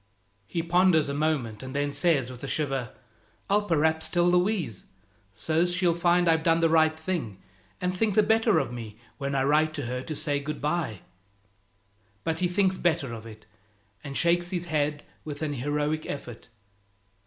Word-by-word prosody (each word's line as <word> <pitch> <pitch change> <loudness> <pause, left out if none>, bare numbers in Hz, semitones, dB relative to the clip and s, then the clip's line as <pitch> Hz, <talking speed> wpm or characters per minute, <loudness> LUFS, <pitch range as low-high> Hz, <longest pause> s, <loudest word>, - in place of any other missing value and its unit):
He 165 - -2
ponders 170 -3 +3
a - - -2
moment, 140 -8 -1
and 130 +1 -7
then 145 0 0
says 145 -4 +1
with 125 +1 -11
a - - -3
shiver 135 -4 -1 0.6
"I'll 205 +1 +2
p'raps 160 -1 +1
tell 175 0 +2
Louise, 180 - +1 0.5
so's 160 - 0
she'll 175 -2 +2
find 175 +1 +2
I've 160 -1 +4
done 165 0 +3
the 165 -1 +3
right 160 -1 +4
thing, 160 - -3 0.4
and 180 0 -1
think 210 +1 +1
the 215 - +5
better 220 -3 +3
of 135 -6 -1
me, 110 -3 -8 0.2
when 140 0 -2
I 135 - +2
write 155 +2 +2
to 145 - -4
her 125 +1 -3
to 155 +3 -5
say 145 -1 -1
good 150 +2 -5
by." 150 - -2 1.2
But 165 0 -1
he 180 - +2
thinks 190 +1 +1
better 145 -8 0
of 115 0 -8
it, 110 -1 -12 0.6
and 140 -1 -5
shakes 175 +1 +2
his 175 -1 -3
head 150 -2 -1 0.2
with 150 0 -6
an 150 -1 -1
heroic 145 +3 -1
effort. 120 -5 -7
155 Hz, 175 wpm, -27 LUFS, 140-175 Hz, 1.2 s, the